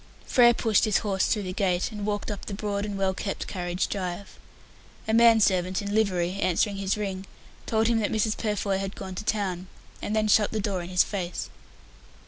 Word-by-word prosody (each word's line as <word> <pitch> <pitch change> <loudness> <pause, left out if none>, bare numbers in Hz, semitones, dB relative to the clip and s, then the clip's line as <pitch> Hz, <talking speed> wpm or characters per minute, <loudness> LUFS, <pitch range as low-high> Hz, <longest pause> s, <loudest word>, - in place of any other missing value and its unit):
Frere 240 -2 +5
pushed 220 -3 +2
his 215 -2 +2
horse 195 -2 +1
through 210 - 0
the 185 -1 -4
gate, 185 0 0
and 210 -1 -5
walked 205 +1 -2
up 205 - -6
the 200 - -4
broad 205 0 -2
and 205 -1 -4
well 190 -1 +1
kept 195 +1 -4
carriage 175 -1 -2
drive. 185 0 -5 0.7
A 220 - 0
man 230 0 +6
servant 185 -2 +2
in 205 -1 -4
livery, 190 -3 +1
answering 195 +2 +1
his 195 +1 -1
ring, 195 -2 -4 0.4
told 220 0 +2
him 230 0 +2
that 210 - -1
Mrs. 220 0 +1
Purfoy 205 -3 -1
had 195 0 -4
gone 190 -1 -7
to 185 - -5
town, 190 -4 -2 0.3
and 210 - -2
then 215 0 +2
shut 210 0 +4
the 220 - -2
door 195 -3 -1
in 175 - -7
his 180 -1 +4
face. 180 -4 -4
200 Hz, 205 wpm, -26 LUFS, 185-215 Hz, 0.7 s, man